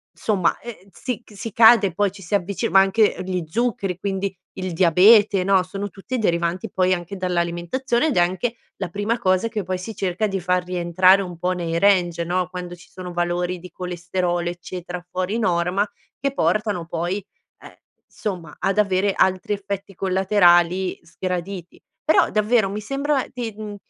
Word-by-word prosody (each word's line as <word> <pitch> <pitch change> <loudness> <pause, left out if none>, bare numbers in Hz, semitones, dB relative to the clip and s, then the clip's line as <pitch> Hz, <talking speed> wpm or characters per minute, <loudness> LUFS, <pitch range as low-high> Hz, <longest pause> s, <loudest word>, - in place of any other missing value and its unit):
insomma 190 -6 +1
ehm, 215 -5 -10
si 245 +5 -5
c 215 - -18
si 220 +3 -6
cade 225 -2 +6
poi 205 +3 +1
ci 195 +1 -13
si 185 +2 -1
avvicina 200 +4 -1
ma 195 - +7
anche, 205 +2 +3
ehm, 185 - -6
gli 180 -2 -2
zuccheri 195 -2 -1
quindi 195 0 -3 0.2
il 185 -1 -3
diabete, 190 +4 +5
no, 190 -1 +3
sono 195 +2 -5
tutti 200 +7 -5
derivanti 175 0 0
poi 185 0 +2
anche 180 +2 -5
dall'alimentazione, 180 - -1
ed 295 - -1
è - - +4
anche 190 +7 0 0.2
la - - -3
prima 205 +6 -1
cosa 185 +4 +1
che 215 -2 -3
poi 185 +1 -2
si 205 +5 -7
cerca 195 +1 -1
di 195 -1 -2
far 180 0 0
rientrare 180 +2 +3
un 180 -3 -7
po' 180 +2 -1
nei 170 -2 -2
range, 175 -3 +3
no, 180 +1 -1
quando 180 -1 -6
ci 175 -1 -15
sono 180 -1 -8
valori 175 +1 -1
di 180 +1 -11
colesterolo, 175 0 -2
eccetera, 175 0 -7
fuori 185 +4 -2
norma 180 0 +1 0.3
che 275 0 -2
portano 200 -3 0
poi, 170 +3 -2 0.4
ehm, - - -14 0.3
insomma 175 -7 -6
ad 195 - 0
avere 200 -1 +2
altri 185 +1 +1
effetti 200 0 -5
collaterali 185 -1 +3
sgraditi. 180 +1 -5 0.2
Però 315 - +4
davvero 215 -1 +2
mi 205 +2 -4
sembra 275 +5 -1
di 240 -3 -4
mhmm, 210 -1 -6
185 Hz, 175 wpm, -22 LUFS, 175-205 Hz, 0.4 s, ma